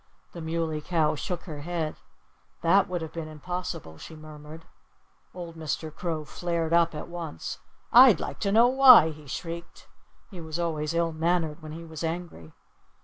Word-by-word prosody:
The 170 - -7
Muley 160 -1 -2
Cow 160 -1 +1
shook 175 +3 -4
her 155 -4 -8
head. 165 -1 -3 0.7
"That 190 +4 +4
would 175 -2 -2
have 160 - -8
been 165 -2 -5
impossible," 160 - -6
she 160 - -10
murmured. 155 +1 -11 0.7
Old 170 -2 -8
Mr. 155 -1 -4
Crow 160 -4 -3
flared 170 0 -2
up 170 -1 +3
at 150 - -6
once. 170 -3 -6 0.3
"I'd 245 -7 +9
like - - -5
to 200 - 0
know 225 +3 +6
why!" 255 -10 +8
he 150 -1 -13
shrieked. 170 +4 -7 0.4
He 180 -3 -8
was 160 0 -5
always 160 -2 -2
ill 170 0 +1
mannered 165 0 -1
when 155 0 -8
he 165 +1 -8
was 160 -1 -8
angry. 165 - -5
165 Hz, 165 wpm, -27 LUFS, 155-175 Hz, 0.7 s, I'd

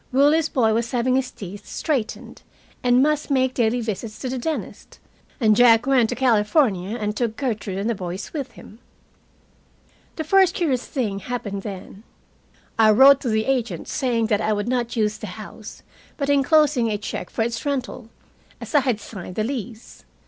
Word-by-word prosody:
Willie's 290 +4 +3
boy 225 -4 +2
was 230 +1 -1
having 255 +1 +1
his 260 -1 0
teeth 200 0 -10
straightened, 270 -9 -3 0.4
and 250 +1 +4
must 300 0 0
make 260 -2 +2
daily 240 0 +1
visits 220 0 -5
to 260 - -5
the 260 0 -3
dentist, 315 +5 -5 0.4
and 215 -4 +4
Jack 235 0 +5
went 260 -5 +3
to 245 - -2
California 220 - +2
and 210 -2 -3
took 225 -1 -2
Gertrude 215 -8 -3
and 200 +2 -2
the 235 - +1
boys 185 -1 -6
with 285 -5 -5
him. 215 - -14 1.4
The 315 - -3
first 375 +3 +4
curious 275 -9 -1
thing 215 -8 -2
happened 205 -3 -5
then. 195 0 -8 0.8
I 220 -1 +6
wrote 265 +5 +7
to 250 - -2
the 220 0 +1
agent, 235 -10 -2
saying 245 -5 0
that 215 -2 +1
I 215 - +1
would 205 +1 -2
not 240 -1 -1
use 215 -1 0
the - - -6
house, - - -10 0.3
but 280 -1 0
enclosing 285 -3 +3
a 210 - -1
check 210 - -6
for 225 - -1
its 230 0 -3
rental, 255 -5 -4 0.5
as - - -9
I 295 - +6
had 255 -6 0
signed 190 -4 -9
the 215 - 0
lease. 235 -2 -6
240 Hz, 180 wpm, -22 LUFS, 215-270 Hz, 1.4 s, wrote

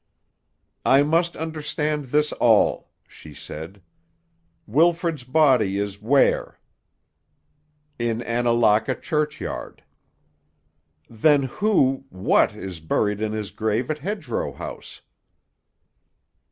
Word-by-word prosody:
"I 135 +2 +5
must 165 +3 +1
understand 150 -1 -3
this 150 +3 +1
all," 110 -3 +2 0.2
she 75 -2 -14
said. 85 +8 -9 0.8
"Wilfrid's 165 - +1
body 125 -7 +3
is 100 0 -4
where?" 135 +6 +2 1.4
"In 120 0 -1
Annalaka 120 0 +2
churchyard." 150 - -4 1.2
"Then 140 +5 +3
who—what 135 - +1
is 95 -3 -7
buried 105 +6 -1
in 110 0 -2
his 105 -2 -4
grave 110 +5 -1
at 155 - -4
Hedgerow 210 - -4
House?" - - -9
130 Hz, 85 wpm, -23 LUFS, 105-150 Hz, 1.4 s, I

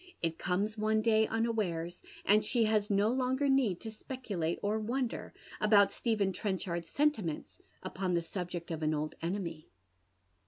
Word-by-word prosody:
It 165 -1 -1
comes 205 +4 -1
one 215 0 +2
day 220 -1 +4
unawares, 205 -7 -1 0.2
and 210 +1 +5
she 235 +2 +2
has 215 -1 +2
no 205 +1 +3
longer 260 +3 +1
need 255 -10 +3
to 220 - -5
speculate 215 -8 -3
or 210 +2 +1
wonder 240 +2 -2 0.3
about 205 -2 +5
Stephen 210 -5 0
Trenchard's 180 -5 -2
serilimenis 190 - 0 0.2
upon 185 -1 -2
cue 170 - +2
sub 180 +1 -4
ject 175 -1 -5
of 160 -1 -3
an 155 0 +1
old 150 +1 -2
enemy. 170 -2 -3
205 Hz, 155 wpm, -32 LUFS, 175-225 Hz, 0.3 s, and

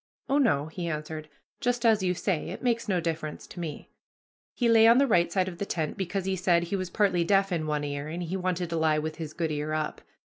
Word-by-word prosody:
"Oh, 280 +2 +2
no," 150 - +3
he 170 +2 -5
answered, 155 0 -5 0.3
"just 245 -2 0
as 220 -3 +5
you 180 -1 +1
say; 180 -3 -1
it - - -7
makes 235 -1 0
no 185 -2 +2
difference 160 -2 -4
to - - -11
me." 160 -4 -6 0.6
He 240 - +1
lay 225 -1 +7
on 230 +1 +7
the 280 - +5
right 175 -9 +3
side 185 +1 +1
of 175 -2 -7
the 200 - -1
tent, 155 -3 -2
because, 195 0 -2
as - - -11
he 190 0 0
said, 175 -2 +2
he 175 +3 -2
was 185 -2 -3
partly 180 -3 +2
deaf 195 +2 +2
in 160 -3 -1
one 150 -1 -1
ear, 145 0 -4
and 170 +3 -4
he 175 +2 -3
wanted 180 -2 -2
to 165 - 0
lie 160 -1 +3
with 155 +1 -3
his 155 -2 -6
good 165 -2 -2
ear 150 +1 -2
up. 155 -1 -2
175 Hz, 255 wpm, -28 LUFS, 155-195 Hz, 0.6 s, lay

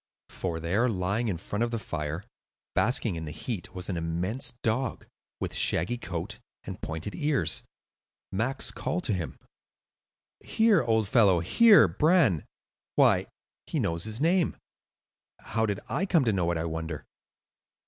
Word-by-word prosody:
For 85 -3 -3
there, 100 +10 +1
lying 100 +3 0
in 95 -6 -1
front 100 +5 -4
of 120 - +2
the 115 - -2
fire, 75 -4 -4 0.5
basking 115 -5 +2
in 80 -1 -5
the 75 - -6
heat, 95 -1 -5
was 90 0 -4
an 90 - -2
immense 85 +9 -2
dog, 120 +4 -1 0.3
with - - -3
shaggy 110 +9 +1
coat 85 -5 -5 0.2
and - - -8
pointed 80 +6 -5
ears. 135 - +1 0.7
Max 115 +8 0
called 180 +1 -3
to 110 - 0
him:— 90 -4 -4 1.0
"Here, 220 -6 +3
old 110 -3 +1
fellow; 100 -5 +5
here, 210 - +6
Bran,—why, 150 - +1 0.4
he - - -1
knows 85 +2 -1
his 110 +1 -3
name. 170 +2 +2 0.8
How 110 -1 -1
did 100 -1 -1
I 195 - -1
come 165 -8 +3
to 110 - +2
know 90 -3 +1
it, 85 - 0
I 80 - -2
wonder!" 80 -2 -4
105 Hz, 150 wpm, -28 LUFS, 85-125 Hz, 1.0 s, here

